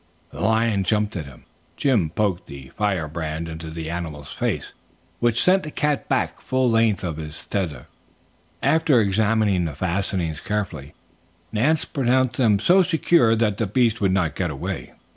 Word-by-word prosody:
The - - -8
lion 110 -2 +2
jumped 105 +2 0
at 80 -5 -4
him. 65 -3 -14 0.3
Jim 115 - +2
poked 95 +1 -1
the 70 -1 -10
firebrand 85 -5 -2
into 80 0 -7
the 80 0 -5
animal's 80 -4 -6
face, - - -2 0.5
which 120 -1 +2
sent 190 +1 +5
the 155 - -6
cat 150 -1 -1
back 130 -2 0
the - - -23
full 130 -2 +1
length 115 -3 +2
of 85 -4 -3
his 75 -1 -8
tether. 80 -11 -3 0.8
After 155 -5 +4
examining 105 -2 +2
the 75 -4 -4
fastenings 90 -1 -2
carefully, 85 -9 -4 0.6
Nance 140 +9 +2
pronounced 130 -1 +1
them 110 -6 +4
so 180 - +5
secure 165 -8 +3
that 110 -3 +1
the 115 - -1
beast 115 +1 +1
would 100 - +3
not 90 -4 +1
get 90 -3 -1
away. 65 -3 -5
100 Hz, 160 wpm, -23 LUFS, 80-115 Hz, 0.8 s, sent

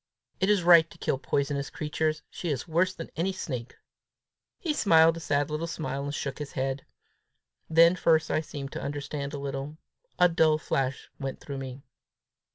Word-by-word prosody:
It 190 - +2
is 205 -4 +3
right 170 -2 +7
to - - -15
kill 135 - -1
poisonous 140 0 -1
creatures: 155 +1 -2
she 175 - -4
is 135 -1 -2
worse 170 +3 +2
than 165 -3 -9
any 180 +4 0
snake!" 130 -10 -5 0.8
He 325 -4 -1
smiled 165 - +5
a - - -6
sad 145 -2 0
little 155 +2 -2
smile, 140 -4 -3
and 145 - -3
shook 140 -2 -4
his 145 -1 -6
head. 135 +1 -2 0.8
Then 165 +2 +6
first 160 -2 +2
I 155 - +2
seemed 140 -3 -7
to - - -5
understand 140 0 -4
a 145 - -5
little. 140 +2 -5 0.4
A 180 - +6
dull 160 -2 +3
flash 135 -3 -2
went 135 -2 -4
through 140 -2 -6
me. 130 0 -7
150 Hz, 175 wpm, -28 LUFS, 140-165 Hz, 0.8 s, right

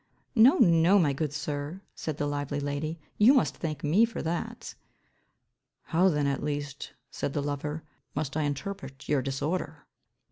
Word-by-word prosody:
"No, 245 +2 +7
no, 170 -2 +5
my 155 -7 +3
good 150 +1 -2
sir," 150 +4 -4
said 155 -2 -4
the 145 - -1
lively 145 0 -2
lady, 145 +3 -3 0.2
"you 235 +7 +7
must 260 - +2
thank 155 -4 -4
me 165 +9 +4
for 230 -1 -1
that". 225 +9 -4 1.1
"How 180 +3 +3
then 150 -4 +1
at 140 -1 0
least," 145 -1 -4 0.2
said 140 - -3
the 145 - -1
lover, 145 +2 -3 0.3
"must 140 -2 -2
I 155 - +1
interpret 145 -2 -4
your 145 -2 +2
disorder?" 145 +3 -3
150 Hz, 155 wpm, -28 LUFS, 145-175 Hz, 1.1 s, No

